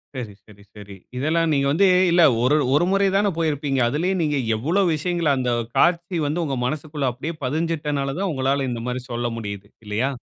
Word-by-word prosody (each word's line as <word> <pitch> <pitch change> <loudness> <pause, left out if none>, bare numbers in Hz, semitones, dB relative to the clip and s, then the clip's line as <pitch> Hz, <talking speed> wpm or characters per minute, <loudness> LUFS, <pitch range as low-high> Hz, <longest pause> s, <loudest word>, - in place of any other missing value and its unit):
சரி, 115 -5 -6
சரி, 100 -1 -17
சரி. 100 -1 -11 0.2
இதெல்லாம் 160 +4 +1
நீங்க 140 -1 +1
வந்து 195 +6 +4 0.2
இல்ல 175 0 +4 0.2
ஒரு 130 +4 +3 0.2
ஒரு 160 +4 +3
முறை 195 0 +3
தானே 200 0 +3
போயிருப்பீங்க. 145 -4 -1
அதிலயே 175 +8 0
நீங்க 150 -2 0 0.2
எவ்ளோ 160 - 0
விஷயங்கள 170 0 -1
அந்த 125 -1 0 0.3
காட்சி 175 0 +2
வந்து 155 +4 -1
உங்க 135 -4 -2
மனசுகுள்ள 145 -1 -2
அப்படியே 150 +7 -6
பதிஞ்சுட்டனால 150 -2 -2
தான் 195 -1 -1
உங்களால 135 0 0
இந்த 115 -1 -4
மாரி 125 0 -3
சொல்ல 120 0 -2
முடியுது. 100 -2 -6 0.2
இல்லையா? 110 +7 -1
145 Hz, 175 wpm, -22 LUFS, 125-165 Hz, 0.3 s, வந்து